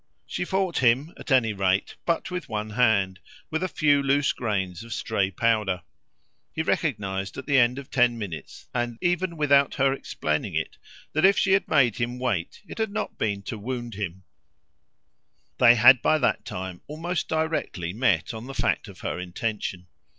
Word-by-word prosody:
She - - -3
fought 190 -3 0
him 130 +6 +2
at - - -9
any 125 -5 +3
rate 95 -1 0
but 170 +1 0
with 180 -5 -5
one 105 -1 -3
hand, 105 -5 +2 0.3
with 160 - -1
a 185 - 0
few 145 -4 +3
loose 140 +1 +2
grains 95 -5 -2
of 115 - -7
stray 100 -4 0
powder. 105 -2 0 0.7
He - - 0
recognised 95 -1 -1
at - - -6
the 140 -2 +4
end 120 +1 +3
of 140 -1 -9
ten 125 -2 +3
minutes, 100 -8 -7
and 120 -1 -2
even 175 -1 0
without 140 -2 +3
her 135 0 +3
explaining 75 - -3
it, - - -3 0.3
that 155 - +1
if 195 +1 +6
she 195 - +2
had 195 +1 +3
made 130 -8 +3
him 120 +1 -2
wait 120 - -2
it - - -9
hadn't 215 -1 -3
been 100 -2 -1
to 110 - -6
wound 120 +1 -5
him; 95 -3 -5 1.4
they 120 -1 +8
had 120 +2 +7
by 155 - +3
that 140 - 0
time 90 -1 -6
almost 165 +4 -3
directly 160 - -2
met 105 -7 +1
on 110 +2 -7
the 135 - -7
fact - - 0
of - - -12
her - - -3
intention. 90 0 -4
120 Hz, 175 wpm, -25 LUFS, 100-145 Hz, 1.4 s, they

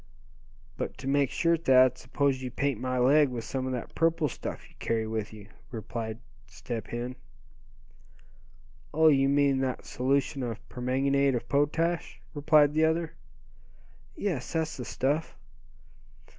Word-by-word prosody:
"But - - -4
to 130 - -7
make 140 -1 +2
sure, 170 0 +2
Thad, 130 -5 +5
suppose 135 0 -1
you 130 - -4
paint 140 -1 -1
my 130 0 -1
leg 140 +3 +5
with 120 -2 -5
some 130 +2 -3
of - - -2
that 125 - -5
purple 165 -1 +2
stuff 125 - -7
you - - -23
carry 115 -1 -1
with 110 -1 -3
you," 105 -2 -12 0.2
pleaded 110 -1 -5 0.3
Step 115 -2 -6
Hen. 120 +2 -4 1.8
"Oh! 160 0 +6
you 135 -2 +4
mean 140 -1 +3
that 130 -1 -2
solution 135 +2 0
of 115 -3 -3
permanganate 135 +2 +1
of 120 0 -4
potash," 160 +5 0
replied 150 0 +4
the 155 +1 +2
other. 160 +1 +1 1.0
"Yes, 170 -11 -3
that's 160 -1 -1
the 125 - -6
stuff." 145 +6 -1
135 Hz, 145 wpm, -28 LUFS, 125-150 Hz, 1.8 s, Oh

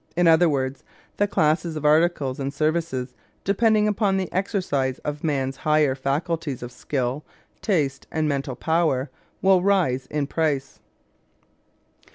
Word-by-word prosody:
In 175 - +4
other 165 +1 +6
words, 135 -2 -2 0.3
the 205 - +2
classes 160 -2 +1
of 150 -1 -4
articles 150 -4 +2
and 135 0 -2
services 155 -4 -1 0.3
depending 215 +1 +3
upon 205 -2 +1
the 185 -2 -3
exercise 160 -9 -1
of 150 0 -4
man's 135 -4 -1
higher 150 -3 +2
faculties 140 +1 -2
of 120 - -7
skill, 130 +2 -3 0.4
taste, 145 -10 0
and 155 -1 0
mental 140 -3 -2
power 155 -3 0 0.3
will 190 -1 +5
rise 175 -10 +1
in 150 -1 -1
price. 145 -2 -1
155 Hz, 135 wpm, -24 LUFS, 135-175 Hz, 0.4 s, other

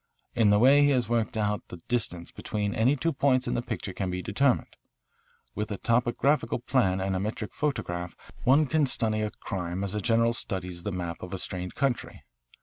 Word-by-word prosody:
In 110 -3 +4
the 105 - +5
way 135 +6 +6
he 145 - +5
has 130 -4 +2
worked 115 -1 0
it - - +1
out 105 -1 0
the 90 - -9
distance 95 -8 -2
between 105 -1 -3
any 125 +6 +3
two 165 +4 -1
points 130 -2 +2
in - - 0
the - - 0
picture 110 -5 -5
can 95 -1 -2
be 90 0 -3
determined. 125 +5 +1 0.8
With 105 0 -3
a 100 - -3
topographical 120 +3 +1
plan 120 -7 +1
and 95 0 -1
a - - 0
metric 105 +1 -4
photograph 90 -12 -2 0.3
one 140 +5 +5
can 150 +1 +2
study 110 -4 +1
a 105 - 0
crime 90 -2 -4
as 100 0 -1
a 105 - -1
general 115 +1 +3
studies 90 -5 -3
the 105 - -3
map 85 -2 -4
of 90 +1 -5
a - - -3
strange 90 0 -4
country. 135 -3 -2
110 Hz, 205 wpm, -28 LUFS, 95-125 Hz, 0.8 s, way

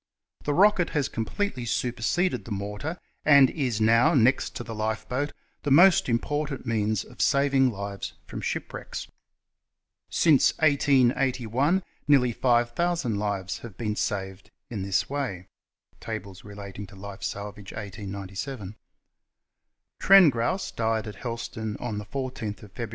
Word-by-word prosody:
The 145 - +1
rocket 190 -2 +4
has 145 - +1
completely 130 - -3
superseded 120 +9 0
the 115 - -9
mortar, 105 - -4 0.3
and 140 -3 +7
is 125 -8 -1
now, 115 +8 +4
next 130 +1 +3
to 120 - -4
the 115 - -7
lifeboat, 115 +6 -2 0.3
the 145 - -2
most 175 +2 +6
important 140 +4 -1
means 110 -3 0
of - - -9
saving 140 -2 +3
lives 100 -3 -5
from - - -7
shipwrecks. - - -5 1.0
Since 155 -5 +4
1881 135 - +2 0.2
nearly 135 -4 +5
five 120 0 +2
thousand 165 -9 0
lives 100 -2 -2
have 115 -6 -10
been 105 -3 -2
saved 95 -3 -3 0.2
in 105 -4 -3
this 95 0 0
way 130 -11 -3 0.5
{Tables 95 -2 -7
relating 100 -1 -8
to 100 - -15
Life 100 0 -9
Salvage 100 0 -6
f - - -9
1897). 100 +2 -6 1.2
Trengrouse 185 -2 +5
died 115 -1 -1
at 105 -3 -8
Helston 110 -3 -5
on 105 -4 -4
14 125 -2 -4
Feb. 105 +3 -8
115 Hz, 130 wpm, -26 LUFS, 105-140 Hz, 1.2 s, and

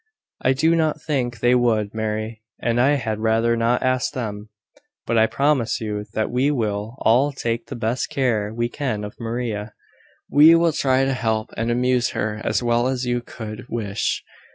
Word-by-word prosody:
"I 130 - +3
do 160 +5 +3
not 155 -2 +1
think 130 -6 -2
they 120 0 +4
would, 115 -4 +2
Mary: 110 0 -3 0.2
and 120 +1 +1
I 140 +3 +4
had 110 -6 -2
rather 115 +1 +2
not 115 +1 +1
ask 130 0 +1
them. 105 -4 -5 0.6
But 115 - +2
I 110 - +5
promise 140 -4 +1
you 105 -2 -4
that 110 -1 -1
we 130 +4 +2
will 110 -4 -2
all 130 +6 +4
take 115 -3 -3
the - - -6
best 120 +1 -2
care 120 -8 0
we 120 +1 -1
can 120 -5 -3
of 105 - -8
Maria. 115 -2 -4 0.5
We 155 +3 +7
will 165 -1 +3
try 135 -2 +2
to 135 - 0
help 110 -3 -1
and 115 +1 -1
amuse 125 +1 +2
her 105 0 -2
as - - 0
well 120 +1 +2
as 130 -1 -1
you 120 0 0
could 110 0 -8
wish." 110 -3 -2
120 Hz, 180 wpm, -22 LUFS, 110-130 Hz, 0.6 s, We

